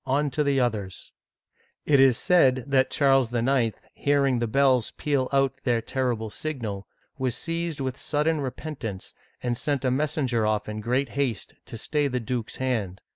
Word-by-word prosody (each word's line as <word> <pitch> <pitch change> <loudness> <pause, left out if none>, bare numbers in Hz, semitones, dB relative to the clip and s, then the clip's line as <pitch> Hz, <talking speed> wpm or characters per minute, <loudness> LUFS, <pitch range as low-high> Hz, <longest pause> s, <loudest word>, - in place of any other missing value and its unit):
On 140 +2 +1
to 150 +3 0
the 140 -1 +2
others! 105 -7 -2 0.4
" - - -60 0.3
It 140 -2 +4
is 135 -3 +6
said 135 -9 +4
that 135 -2 +2
Charles 135 -4 +3
IX., 120 -1 +1 0.2
hearing 140 -3 +2
the 120 - 0
bells 130 -1 +3
peal 140 -3 0
out 135 -1 +1
their 120 -3 +2
terrible 115 -3 -2
signal, 105 -4 -5 0.3
was. 130 -2 -1
seized 165 -2 -3
with 130 -1 -3
sudden 150 +1 0
repentance, 130 -7 -5 0.3
and 120 -1 0
sent 140 +1 -2
a 130 - +2
messenger 130 -4 0
off 105 -1 0
in 105 0 -5
great 125 +4 0
haste 125 -6 -2
to - - -8
st^y 145 +5 -1
the 125 - 0
duke's 120 -1 -4
hand. 110 -8 -2
130 Hz, 170 wpm, -26 LUFS, 115-140 Hz, 0.4 s, is